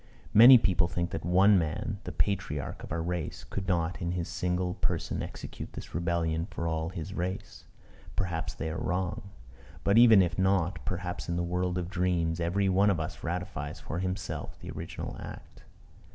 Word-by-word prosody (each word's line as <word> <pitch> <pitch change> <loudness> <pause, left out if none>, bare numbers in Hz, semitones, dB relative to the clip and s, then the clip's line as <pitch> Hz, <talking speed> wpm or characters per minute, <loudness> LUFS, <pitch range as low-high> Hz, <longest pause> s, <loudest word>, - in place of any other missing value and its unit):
Many 120 +4 +11
people 90 -6 +2
think 85 0 -2
that - - -4
one 95 +4 +5
man, 85 +6 -2
the - - -4
patriarch 100 -9 -1
of - - -9
our 80 +1 -1
race, 85 -2 -3
could 100 -2 -5
not 90 0 0
in 85 0 -1
his 85 -2 -2
single 90 +1 -1
person - - -1
execute - - -7
this - - -9
rebellion 85 0 0
for 85 - -3
all 80 0 -1
his 90 +1 -6
race. 90 +2 -4 0.5
Perhaps 85 -4 -2
they 80 - -3
are 80 - -4
wrong. 90 +1 -2 0.5
But, 100 +3 +5
even 115 -5 +8
if 85 +1 -2
not, 95 -1 +1
perhaps 90 -1 -4
in 85 - 0
the 85 - 0
world 90 +1 -1
of 90 -2 -2
dreams 90 -3 0
every 90 +4 +1
one 95 +2 +4
of 95 -4 +1
us 80 +2 -5
ratifies 90 +2 -4
for 80 - -4
himself 90 0 -4
the - - -7
original - - -6
act. - - -10
90 Hz, 180 wpm, -29 LUFS, 85-95 Hz, 0.5 s, Many